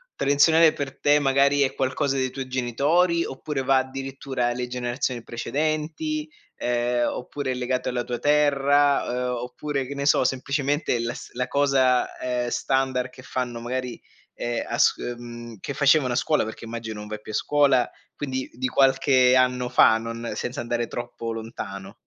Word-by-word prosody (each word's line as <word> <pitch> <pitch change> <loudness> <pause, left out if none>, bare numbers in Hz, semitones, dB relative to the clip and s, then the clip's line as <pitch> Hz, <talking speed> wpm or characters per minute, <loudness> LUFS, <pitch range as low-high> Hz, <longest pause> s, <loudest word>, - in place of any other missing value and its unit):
tradizionale 155 +3 +5
per 140 -2 -6
te 145 0 +5
magari 140 +1 +3
è 135 - +2
qualcosa 135 +1 0
dei 130 -1 0
tuoi 135 -1 -5
genitori 145 +8 +1
oppure 135 +1 -4
va 130 0 +3
addirittura 135 -1 -3
alle 125 0 -2
generazioni 125 0 -2
precedenti, 155 +5 -2 0.3
ehm, 120 0 0
oppure 130 +1 -4
è - - 0
legato 125 0 -2
alla 125 -1 -2
tua 120 0 -3
terra, 145 0 +3
ehm, 125 0 -2
oppure, 130 +3 -3
che 140 - -7
ne 140 0 -3
so, 140 - +4
semplicemente 140 +1 0
la 120 +1 -2
s - - -10
la 125 +1 -2
cosa, 135 -3 +2
ehm, 125 -1 -1
standard 130 0 0
che 130 - -14
fanno 125 -1 -4
magari, 125 0 -4 0.3
ehm, 120 0 -2
a - - -3
s - - +5
mhmm, 120 -1 -7
che 140 - -5
facevano 140 -2 +3
a - - -1
scuola, 150 0 +1
perché 110 +1 -8
immagino 115 -2 -6
non 105 - -8
vai 105 0 -6
più 110 - -9
a - - -4
scuola, 140 -4 +3 0.3
quindi 130 -2 -4
di 125 +2 -4
qualche 130 -1 +4
anno 125 -1 +2
fa, 110 - +5
non 115 +1 -5
senza 125 +1 -4
andare 120 0 -2
troppo 120 -1 -5
lontano. 100 -4 -7
130 Hz, 170 wpm, -24 LUFS, 120-140 Hz, 0.3 s, tradizionale